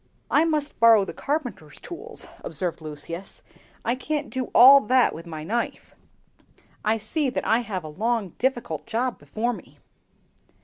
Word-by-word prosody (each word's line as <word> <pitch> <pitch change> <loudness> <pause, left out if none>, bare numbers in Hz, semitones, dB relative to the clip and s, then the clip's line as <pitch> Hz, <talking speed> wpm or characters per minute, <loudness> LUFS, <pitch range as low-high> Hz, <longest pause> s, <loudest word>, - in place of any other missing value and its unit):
"I 310 - +5
must 305 -3 -1
borrow 225 -3 +6
the - - -7
carpenter's 245 - -4
tools," 345 - -7 0.2
observed 175 -3 -2
Lucius; 155 +4 -7 0.4
"I 235 - +2
can't 290 +3 -3
do 260 -1 -2
all 270 +4 +8
that 255 -1 +4
with 165 +2 -9
my 155 -2 -6
knife. 230 +8 -3 0.9
I 220 +1 +2
see 265 +7 -1
that 250 - -3
I 225 - +3
have 205 -7 -4
a - - -7
long, 215 +5 -1
difficult 240 - -1
job 245 +2 -1
before 235 +3 -2
me." - - -12
230 Hz, 150 wpm, -25 LUFS, 185-260 Hz, 0.9 s, all